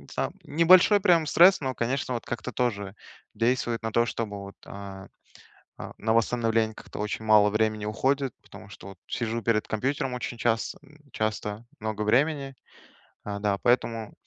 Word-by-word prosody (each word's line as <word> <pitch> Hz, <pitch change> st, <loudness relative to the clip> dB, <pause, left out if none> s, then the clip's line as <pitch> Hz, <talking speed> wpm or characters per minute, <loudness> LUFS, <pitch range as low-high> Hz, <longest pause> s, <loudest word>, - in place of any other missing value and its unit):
за -, -, -1 dB
небольшой 175 Hz, +6 st, +5 dB
прям 175 Hz, -5 st, +4 dB
стресс, 180 Hz, +5 st, +6 dB
но, 130 Hz, -2 st, -2 dB
конечно, 130 Hz, +2 st, -2 dB
вот, 115 Hz, -, -5 dB
как-то 120 Hz, +1 st, -5 dB
тоже 105 Hz, -6 st, -2 dB, 0.4 s
действует 120 Hz, +1 st, 0 dB
на 110 Hz, -, -2 dB
то, 115 Hz, +1 st, +3 dB
чтобы 110 Hz, -3 st, -4 dB
вот, 100 Hz, 0 st, -10 dB
а, 100 Hz, -1 st, -9 dB, 0.7 s
а, -, -, -7 dB
на 110 Hz, +1 st, 0 dB
восстановление 115 Hz, -1 st, +1 dB
как-то -, -, -10 dB
очень 105 Hz, +1 st, -3 dB
мало 105 Hz, -1 st, +6 dB
времени 110 Hz, 0 st, 0 dB
уходит, 135 Hz, +4 st, 0 dB
потому 105 Hz, -, -13 dB
что 100 Hz, -, -11 dB
вот 95 Hz, -2 st, -12 dB
сижу 115 Hz, -1 st, -2 dB
перед 110 Hz, 0 st, +1 dB
компьютером 135 Hz, +4 st, -1 dB
очень 125 Hz, -1 st, -5 dB
часто, 115 Hz, -1 st, -1 dB
м, 150 Hz, +1 st, -20 dB
часто 110 Hz, 0 st, -3 dB, 0.2 s
много 110 Hz, 0 st, -3 dB
времени, 135 Hz, +5 st, +1 dB, 0.7 s
а, 100 Hz, -1 st, -5 dB
да. 100 Hz, -1 st, 0 dB
Поэтому 115 Hz, -3 st, 0 dB
115 Hz, 160 wpm, -26 LUFS, 105-130 Hz, 0.7 s, стресс